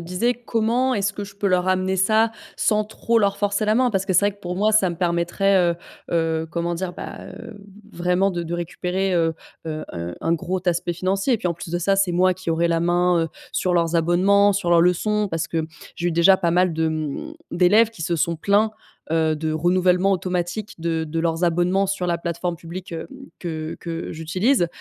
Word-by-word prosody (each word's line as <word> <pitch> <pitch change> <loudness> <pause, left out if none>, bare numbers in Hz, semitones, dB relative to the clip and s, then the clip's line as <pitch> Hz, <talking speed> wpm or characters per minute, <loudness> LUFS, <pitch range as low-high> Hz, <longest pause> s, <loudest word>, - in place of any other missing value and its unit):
disais: 180 +8 0
«Comment 240 +3 +1
est-ce 200 0 0
que 205 +1 -5
je 200 0 -13
peux 200 - -1
leur 180 -1 +2
ramener 185 0 +1
ça 220 +4 +3 0.2
sans 215 -1 +2
trop 230 +2 0
leur 200 -2 +1
forcer 205 +1 0
la 215 - +3
main»? 250 0 +3
Parce 195 -1 -1
que 185 - 0
c'est 175 - +6
vrai 205 - 0
que, 200 - -25
pour 180 -1 -4
moi, 215 +2 +2
ça 200 -3 +4
me 170 - -5
permettrait, 175 +1 +2
heu - - -16 0.3
heu, 160 -1 0
comment 170 0 -2
dire? 180 +1 -4
Ben, - - -8
heu, 230 -3 -10 0.3
vraiment 180 +3 +1
de 175 -1 -3
de 170 +1 -4
récupérer, 180 +2 -2
heu, 165 -2 +1 0.3
heu, 155 -1 -4
heu, 85 0 -5
un 165 - +1
gros 175 +3 -1
aspect 175 0 0
financier 195 +7 0
et - - -1
puis, 180 -4 -1
en 170 - -1
plus 170 - -9
de 175 - -1
ça, 195 +3 +1
c'est 195 -3 +2
moi 185 +1 +3
qui 185 -1 -8
aurais 170 +1 +1
la 165 0 +1
main, 175 0 +2
heu, - - -4 0.2
sur 180 -1 0
leurs 170 -1 +1
abonnements, 190 +5 +4
sur 175 -3 -1
leurs 170 -1 +6
leçons. 205 +4 +2
Parce 165 0 -2
que 160 -1 -2 0.3
j'ai 175 - -1
eu 170 - -1
déjà 185 +3 +5
pas 170 -3 +1
mal 180 0 +3
de, 160 0 0
mmh, 155 - -4 0.2
d'élèves 210 +6 +4
qui 225 - -15
se 170 +1 0
sont 170 +1 0
plaints, 205 +6 +2 0.4
heu, 160 -1 +2
de 155 0 -2
renouvellement 180 +3 +2
automatique 185 +3 -2
de 165 -1 -1
de 165 +1 -3
leurs 165 +1 0
abonnements 175 +3 +2
sur 190 -2 -2
la 170 -1 0
plateforme 170 0 -3
publique, 175 +2 -8
heu, 165 - -5 0.3
que 160 -2 -5
que 165 -1 -5
j'utilise. 175 - +1
180 Hz, 220 wpm, -22 LUFS, 170-195 Hz, 0.4 s, c'est